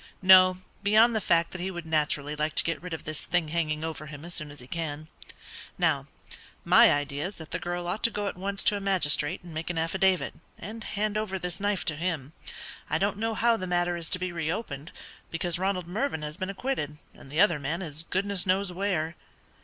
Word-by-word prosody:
"No, 185 -1 +8 0.2
beyond 220 +3 +5
the 220 - +1
fact 170 -2 +2
that 180 - -6
he 185 - -2
would 175 -3 -6
naturally 150 -2 0
like 150 +1 -1
to - - +6
get 165 - -2
rid 180 0 -7
of 160 - -4
this 155 0 -3
thing 175 -3 0
hanging 155 -1 -1
over 155 -1 -5
him 150 +1 -9
as 175 - -8
soon 150 -3 -2
as 145 0 -11
he 125 - -10
can. 155 +1 -5 0.7
Now, - - +1 0.6
my - - +7
idea 145 +2 -1
is 200 - -9
that 160 -1 -11
the - - -1
girl 175 0 -3
ought 200 +5 -2
to - - +5
go 205 -2 -3
at 200 - -2
once 195 +2 -1
to 210 - +4
a 200 - -3
magistrate 175 -4 +2
and 175 -2 -10
make 160 +2 -4
an 175 - -2
affidavit, 185 +3 +1 0.2
and 220 +5 -7
hand 210 +1 -1
over 200 -3 -2
this 180 0 -3
knife 205 -1 0
to 155 - +1
him. 160 -3 -3 0.6
I 155 - +2
don't 200 +3 0
know 225 0 -1
how 235 0 +3
the 185 - -4
matter 175 0 +1
is 170 -1 -2
to - - +1
be 180 0 -3
re 165 -2 -2
opened, 165 -7 -5 0.4
because 170 +1 0
Ronald 190 -2 0
Mervyn 195 - -2
has 150 0 -4
been 185 +1 -4
acquitted, 195 - -3 0.2
and - - -15
the 150 +4 -2
other 175 -6 +5
man 160 +6 -2
is 155 -2 -2
goodness 190 +2 0
knows 190 +1 +2
where." 175 -4 -1
175 Hz, 225 wpm, -28 LUFS, 155-195 Hz, 0.7 s, No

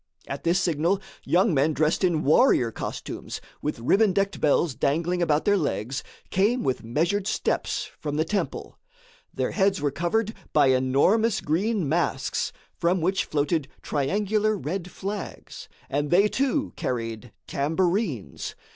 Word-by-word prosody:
At - - -5
this 170 +2 +3
signal, 170 +2 +1 0.3
young 185 +3 +3
men 150 +2 +2
dressed 155 +5 +1
in 170 -4 +2
warrior 140 - +4
costumes - - -6 0.2
with 150 - -2
ribbon 195 - +3
decked 195 +1 0
bells 150 0 +3
dangling 170 +7 0
about 155 -3 +2
their 205 - +4
legs 135 - -2 0.3
came 220 +6 +2
with 130 -2 -1
measured 170 - 0
steps - - -1
from 145 -1 -3
the 155 +1 +1
temple. 205 +4 -3 0.5
Their - - -2
heads 195 -2 +2
were 145 -1 0
covered 200 +9 0 0.2
by 145 -3 +5
enormous 140 - +3
green 190 +3 0
masks, 145 -4 0 0.2
from 175 +2 +1
which 185 +4 +1
floated 150 0 0 0.2
triangular 210 +8 0
red 180 +1 -4
flags, 200 +2 -6 0.2
and 145 +2 -1
they, 195 +4 +5
too, 275 +5 0
carried 115 -1 -4
tambourines. 165 - -1
170 Hz, 140 wpm, -25 LUFS, 145-200 Hz, 0.5 s, by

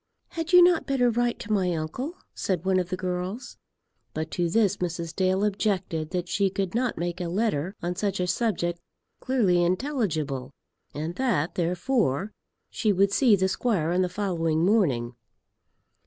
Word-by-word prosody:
"Had 330 -1 -4
you 360 -1 +9
not 350 -2 +3
better 250 -3 +2
write 240 +1 0
to 215 - -2
my 185 -3 +1
uncle?" 245 - -4 0.2
said 185 -3 -2
one 190 -1 +3
of 180 -1 -2
the 185 - -2
girls. 185 +6 -4 0.6
But 160 0 -3
to 175 -1 0
this 205 +1 +2
Mrs. 170 -2 -4
Dale 190 +1 +1
objected 190 -6 -1
that 180 0 -3
she 195 +2 +1
could 190 -1 -3
not 245 0 0
make 175 +2 -3
a 175 - -2
letter 185 -2 -1
on 175 +1 -2
such 200 0 -1
a 180 - +1
subject 180 -3 -1 0.4
clearly 200 -10 +2
intelligible, 175 - -1 0.5
and 155 +3 -3
that 185 - 0
therefore 180 - 0 0.4
she 215 - +1
would 195 +1 +3
see 240 -4 +5
the 190 -1 +1
squire 190 -5 0
on 180 +1 +2
the 180 - +1
following 170 -4 0
morning. 140 - +2
185 Hz, 165 wpm, -26 LUFS, 170-220 Hz, 0.6 s, you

